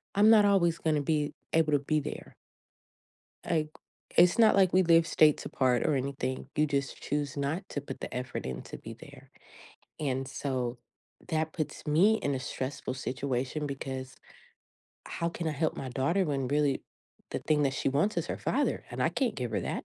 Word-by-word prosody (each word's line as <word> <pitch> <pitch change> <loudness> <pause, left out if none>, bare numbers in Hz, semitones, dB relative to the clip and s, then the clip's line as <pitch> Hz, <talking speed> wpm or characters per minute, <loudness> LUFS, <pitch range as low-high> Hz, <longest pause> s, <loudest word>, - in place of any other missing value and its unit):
"I'm 210 +2 +6
not 215 -2 +7
always 170 -5 +3
gonna 155 -2 +1
be 150 0 0 0.2
able 160 -2 +3
to 145 - +4
be 155 +2 0
there." 150 - -7 1.1
Like, 155 -2 0 0.5
it's 180 +5 +6
not 220 -3 +6
like 190 -2 +4
we 185 +1 +5
live 165 -1 +5
states 155 -2 +4
apart 125 -2 +1
or 150 - +2
anything, 130 0 -3
you 155 0 +3
just 140 -2 -2
choose 145 -1 -2
not 155 +7 -2
to 145 - -3
put 135 -1 -8
the - - -6
effort 125 +1 -4
in 65 -1 -4
to - - -8
be - - -9
there. - - -14 0.7
And 135 -3 -1
so, 130 -3 -3 0.5
that 160 -1 -1
puts 155 -3 -4
me 180 +9 +5
in 140 -1 0
a 130 - -3
stressful 130 0 -4
situation, 130 +2 -2
because 135 -2 -5 0.9
how 170 - -2
can 165 -1 -3
I - - -1
help 155 +2 -1
my 135 - -5
daughter 155 +10 +1
when 140 -4 -1
really 145 -1 +1 0.5
the - - -2
thing 150 -1 +2
that 135 - +2
she - - 0
wants 145 +10 +1
is - - -2
her - - -3
father, - - 0
and - - -3
I - - +3
can't 245 -6 0
give 125 -2 -3
her - - 0
that. - - -3
145 Hz, 190 wpm, -30 LUFS, 135-165 Hz, 1.1 s, not